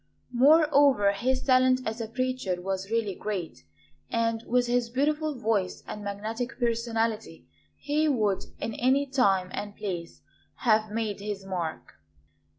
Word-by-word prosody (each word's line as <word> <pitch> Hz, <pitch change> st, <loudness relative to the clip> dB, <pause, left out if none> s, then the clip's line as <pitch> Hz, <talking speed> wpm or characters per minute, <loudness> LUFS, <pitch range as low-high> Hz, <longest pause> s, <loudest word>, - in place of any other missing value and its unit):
Moreover, 280 Hz, -5 st, +5 dB
his 255 Hz, +6 st, -1 dB
talent 255 Hz, -1 st, +4 dB
as 220 Hz, +2 st, -3 dB
a 225 Hz, -, -3 dB
preacher 255 Hz, -6 st, -2 dB
was 190 Hz, +1 st, -3 dB
really 225 Hz, -3 st, 0 dB
great; 180 Hz, -, -5 dB, 0.4 s
and 230 Hz, -1 st, 0 dB
with 245 Hz, 0 st, +2 dB
his 245 Hz, -1 st, 0 dB
beautiful 300 Hz, +4 st, 0 dB
voice 210 Hz, -5 st, -1 dB
and 210 Hz, -, -7 dB
magnetic 220 Hz, +5 st, -4 dB
personality, 225 Hz, -, -1 dB, 0.3 s
he 305 Hz, +2 st, 0 dB
would 215 Hz, -9 st, +1 dB
in 225 Hz, -, -3 dB
any 265 Hz, +5 st, +2 dB
time 200 Hz, -9 st, +2 dB
and 205 Hz, 0 st, -5 dB
place 180 Hz, -5 st, -5 dB, 0.3 s
have 215 Hz, -3 st, +2 dB
made 215 Hz, -2 st, -2 dB
his 200 Hz, -1 st, -5 dB
mark. 170 Hz, -, -5 dB
225 Hz, 135 wpm, -27 LUFS, 200-255 Hz, 0.4 s, Moreover